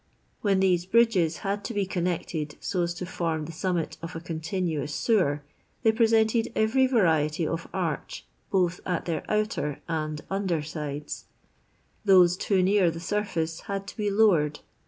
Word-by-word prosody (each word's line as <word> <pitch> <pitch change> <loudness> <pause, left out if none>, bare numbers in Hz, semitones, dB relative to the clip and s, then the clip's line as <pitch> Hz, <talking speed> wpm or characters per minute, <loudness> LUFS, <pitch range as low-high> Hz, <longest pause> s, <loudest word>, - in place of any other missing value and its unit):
When 195 -2 +2
these 180 -2 +2
bridges 195 -7 +3
had 200 +1 -1
to 235 - -4
be 200 -1 +1
connected 170 -4 -2
so 185 -3 -1
as 170 0 -1
to 180 - -5
f 180 - -11
rm 160 -3 0
the 165 - -7
summit 170 -1 -2
of 165 +1 -7
a - - -3
continuous 160 -2 -3
sewer, 150 -11 +2 0.4
they 220 - +6
presented 225 0 +3
every 250 +5 +3
variety 165 - +2
of 165 +2 -3
arch, 165 -6 -3 0.2
both 180 -2 +1
at 180 -2 -2
their 165 -3 -1
outt 215 +1 +1
r 145 -1 -3
and 155 -2 -2
under 190 -5 -1
sides; 150 -1 -5 0.8
those 180 -4 +6
too 190 0 +1
near 190 -1 +4
the 165 0 -5
surface 165 -4 -2
had 195 0 -2
to - - -7
l)e 205 - +2
lowered. 190 -8 +3
180 Hz, 165 wpm, -27 LUFS, 160-200 Hz, 0.8 s, they